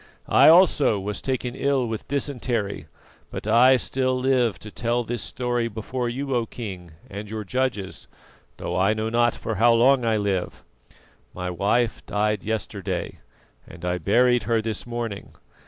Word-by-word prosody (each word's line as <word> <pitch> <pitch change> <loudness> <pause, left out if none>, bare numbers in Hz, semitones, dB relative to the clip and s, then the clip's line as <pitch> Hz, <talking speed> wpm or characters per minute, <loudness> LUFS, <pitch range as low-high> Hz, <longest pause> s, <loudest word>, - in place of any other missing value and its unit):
I - - +6
also 160 - +5
was 100 +2 -4
taken 130 -2 -2
ill 135 -1 0
with 110 -2 -5
dysentery, 125 -7 -2 0.4
but - - -7
I 125 +4 +6
still 130 0 -1
live 125 -4 +2
to 105 - -11
tell 120 +2 -1
this 120 +1 -4
story 120 -2 -2
before 120 +3 -4
you, 135 +3 -3
O 120 -2 0
King, 95 -8 -8
and 100 +1 -8
your 110 0 -4
judges, 120 -3 -3 0.5
though - - -4
I 95 +4 +2
know 110 +1 -2
not 120 0 +2
for 110 - -4
how 120 0 +6
long 125 +2 +4
I 115 -2 +2
live. 100 -3 -2 0.7
My 90 0 -3
wife 105 +6 0
died 105 0 0
yesterday, 100 -4 -4 0.5
and 85 - -10
I 90 0 -1
buried 125 +7 +3
her 115 -1 +2
this 110 +1 -4
morning. 120 -4 -5
115 Hz, 155 wpm, -24 LUFS, 105-125 Hz, 0.7 s, I